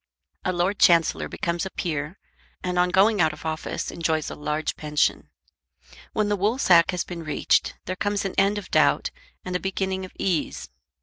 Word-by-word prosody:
A 185 - 0
Lord 185 +3 0
Chancellor 170 -2 +4
becomes 170 0 -2
a 190 - -3
peer, 155 0 -3 0.5
and 180 -1 -1
on 180 0 +3
going 200 +2 +4
out 160 -1 +3
of - - -12
office 160 0 -3
enjoys 160 -2 -1
a - - -6
large 150 +1 -2
pension. 150 0 0 0.8
When 215 -1 0
the 205 - +1
woolsack 200 -4 +4
has 180 -2 -1
been 175 -2 -7
reached 150 -2 +1
there 185 - -3
comes 205 +1 -1
an 195 - -2
end 200 +1 +3
of 205 - -7
doubt, - - +3 0.3
and 180 -1 -4
a - - +1
beginning 190 0 -2
of 185 - -8
ease. 180 -5 -2
180 Hz, 180 wpm, -25 LUFS, 160-195 Hz, 0.8 s, Chancellor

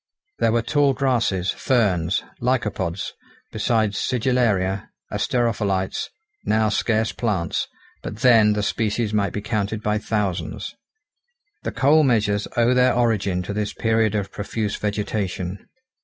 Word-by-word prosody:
There 115 - +3
were 115 0 +1
tall 140 +1 +2
grasses, 115 -9 +1
ferns, 95 - +1 0.2
lycopods, 105 -8 -1 0.4
besides 110 -4 0
sigillaria, 110 -7 +1 0.2
asterophyllites, 105 -6 0 0.4
now 110 0 +2
scarce 110 +1 +1
plants, 95 -8 -1 0.3
but - - -6
then 115 -4 +6
the 105 0 -1
species 110 +1 -1
might 100 -3 +1
be 105 - -4
counted 110 0 -2
by 105 0 +1
thousands. 105 -4 -2 0.9
The - - -3
coal 145 +4 +4
measures 105 -7 +2
owe 120 +1 +4
their 125 -1 +4
origin 100 -7 +1
to 100 - -5
this 105 0 -2
period 110 -1 +1
of 100 -2 -2
profuse 105 0 -3
vegetation. 100 -3 -3
105 Hz, 125 wpm, -22 LUFS, 100-120 Hz, 0.9 s, then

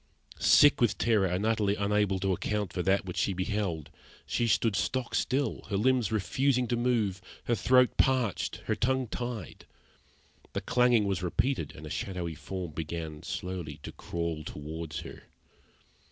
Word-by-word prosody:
Sick 145 -3 +6
with 120 - +3
terror 110 -5 +3
and 90 +4 -1
utterly 110 -3 +2
unable 100 -1 +1
to 95 -1 +1
account 105 +1 -2
for 90 - -1
what 95 0 0
she 100 - +1
beheld, 90 -6 -2 0.3
she 120 - 0
stood 110 -1 +2
stock 120 +9 -1
still, 135 +2 0
her 100 - 0
limbs 125 0 +2
refusing 125 +5 +1
to 120 - +2
move, 115 -6 0 0.2
her 120 - 0
throat 125 +1 +4
parched, 130 -6 +1
her - - +1
tongue 130 +1 0
tied. 120 -5 -6 0.9
The - - -2
clanging 125 -3 +3
was 95 -2 -1
repeated, 90 - -1
and 75 - -10
a 75 - -7
shadowy 90 -4 -3
form 90 +2 -6
began 80 0 -5
slowly 90 -5 -5
to - - -6
crawl 85 -2 -4
towards 75 +1 -6
her. - - -11
100 Hz, 155 wpm, -29 LUFS, 90-120 Hz, 0.9 s, Sick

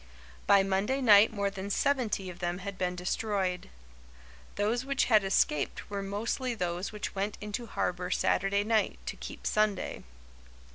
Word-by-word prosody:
By 200 -1 +6
Monday 195 +7 0
night 215 -4 +7
more 200 -2 -1
than 195 0 -6
seventy 230 -4 0
of 175 - -13
them 175 0 -2
had 200 +1 -6
been 180 -1 -2
destroyed. 185 0 -2 0.9
Those 225 +4 0
which 275 0 +1
had 215 -4 +4
escaped 170 -4 0
were 200 -1 -2
mostly 225 +5 -2
those 180 -1 -2
which 210 -1 -5
went 200 +1 -2
into 210 +3 -5
harbour 180 -3 -2
Saturday 195 +2 +1
night, 220 0 +1
to - - -4
keep - - -9
Sunday. 210 -3 0
200 Hz, 150 wpm, -30 LUFS, 190-215 Hz, 0.9 s, night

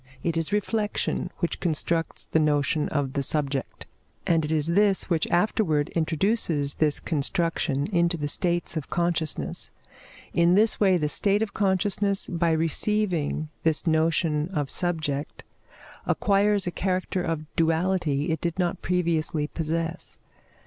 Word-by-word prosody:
It 165 -1 0
is 165 +2 -1
reflection 210 +1 -1
which 170 - -1
constructs 165 0 -1
the 160 - +1
notion 150 0 +1
of 140 -3 -1
the 140 - 0
subject, 140 -2 -2 0.4
and 165 -2 +2
it 150 - -3
is 155 -2 +1
this 195 +3 +2
which 165 -2 +1
afterwards 175 -5 +1
introduces 160 -3 0
this 150 -2 +1
construction 150 -2 0
into 170 -3 +1
the 145 -2 -2
states 170 +2 0
of 155 -4 -4
consciousness; 170 -3 -1 0.6
in 170 +1 +4
this 215 +2 +3
way 190 -3 +4
the 150 -3 0
state 200 +7 +2
of 205 - -5
consciousness, 200 0 +1
by 170 -1 +1
receiving 165 -1 0
this 160 -1 +1
notion 160 -1 +1
of 145 -3 -1
subject, 155 -5 -2 0.6
acquires 205 0 +2
a 175 - -2
character 185 0 -1
of 165 -3 -3
duality 165 -3 +1
it 160 - -2
did 170 0 -2
not 175 -2 -1
previously 165 -4 0
possess. 165 +1 -3
165 Hz, 135 wpm, -26 LUFS, 155-185 Hz, 0.6 s, in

